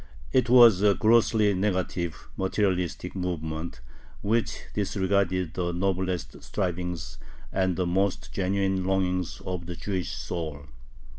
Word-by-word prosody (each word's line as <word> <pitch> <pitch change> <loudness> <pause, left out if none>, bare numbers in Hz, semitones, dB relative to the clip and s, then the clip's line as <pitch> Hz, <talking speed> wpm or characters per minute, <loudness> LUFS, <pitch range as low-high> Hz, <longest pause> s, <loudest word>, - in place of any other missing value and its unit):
It 125 -2 +3
was 120 -6 +8
a 100 -1 +5
grossly 110 -2 +4
negative, 90 -3 -2
materialistic 95 -2 -1
movement, 80 -5 -4 0.4
which 110 +3 0
disregarded 95 -3 0
the 85 -1 -2
noblest 95 -1 -2
strivings 90 -3 -3 0.3
and 95 -2 +1
the 90 - 0
most 95 +2 0
genuine 95 0 0
longings 90 -2 0
of 90 -2 -4
the 90 - -5
Jewish 90 -2 -3
soul. 75 -1 -5
95 Hz, 115 wpm, -27 LUFS, 90-100 Hz, 0.4 s, was